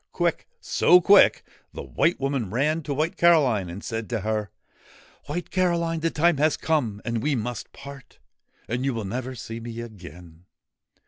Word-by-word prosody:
Quick - - -1
so 180 - +4
quick 200 +3 +5 0.3
the - - -7
White 170 +1 0
Woman 135 -6 -1
ran 150 - 0
to 145 -1 -4
White 155 +4 -1
Caroline 135 - +3
and 90 +5 -8
said 115 -1 -4
to 115 -3 -2
her: 105 0 -2 0.4
' - - -26
White 175 - -5
Caroline, 170 -3 0
the 165 +1 0
time 165 0 +2
has 155 +2 +2
come, 120 -10 -1
and 115 -1 -2
we 145 +3 0
must 120 0 -5
part; 140 -2 -12 0.5
and 120 +3 -2
you 135 -2 -1
will 110 -2 -4
never 130 +5 -4
see 115 -1 -7
me 115 0 -7
again. 90 -6 -11
125 Hz, 175 wpm, -25 LUFS, 110-155 Hz, 0.5 s, quick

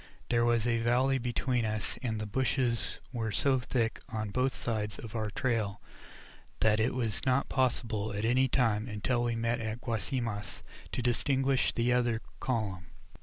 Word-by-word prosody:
There 120 -1 +3
was 120 -1 +3
a 115 -1 +2
valley 130 +3 +3
between 125 0 0
us, 110 -1 -2
and 115 -4 -2
the 110 - -3
bushes 125 +1 0 0.2
were 115 -3 -1
so 130 +5 +2
thick 120 -2 -1
on 110 -2 -3
both 130 +4 +2
sides 105 -5 -2
of 115 0 -8
our 110 -2 -1
trail 110 -4 -1 0.8
that 110 -1 +4
it 115 +3 +1
was 115 -5 -1
not 130 0 +2
possible 115 -5 0
at 100 +2 -2
any 130 +3 +4
time, 115 -3 +2
until 120 +3 0
we 120 -1 0
met 115 +1 0
at 110 +1 -3
Guasimas, 115 -3 -3 0.3
to 125 - -1
distinguish 135 +2 +2
the 120 +1 +1
other 120 -2 +2 0.2
column. 100 -8 -2
115 Hz, 165 wpm, -31 LUFS, 110-125 Hz, 0.8 s, that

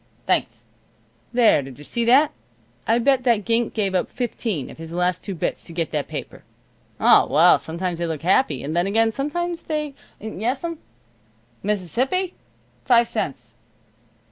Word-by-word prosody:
Thanks. - - 0 0.7
There, 235 -10 +4
did 135 -2 -10
you 145 - -11
see 235 +10 -1
that? 280 +6 +5 0.6
I 225 - +4
bet 260 +1 +2
that 235 -5 +2
gink 230 0 0
give 200 -4 0
up 185 - 0
fifteen 225 - -3
of - - -14
his 165 0 -8
last 180 +1 0
two 195 - -5
bits 160 - -3
to 170 - -10
get 165 -1 -2
that 150 -2 -2
paper. - - -7 0.6
O, - - +6
well, 160 +6 +5
sometimes 170 +1 -3
they 170 - -1
look 160 -2 -4
happy, 180 - +2
and 150 +3 -4
then 175 +2 +2
again 225 +2 +3
sometimes 340 +7 -3
they 300 -2 -3 0.3
Yes'm. 255 - -3 0.8
Mississippi? 245 - -1 0.5
Five 235 -2 +4
cents. 130 - -4
215 Hz, 155 wpm, -22 LUFS, 170-250 Hz, 0.8 s, O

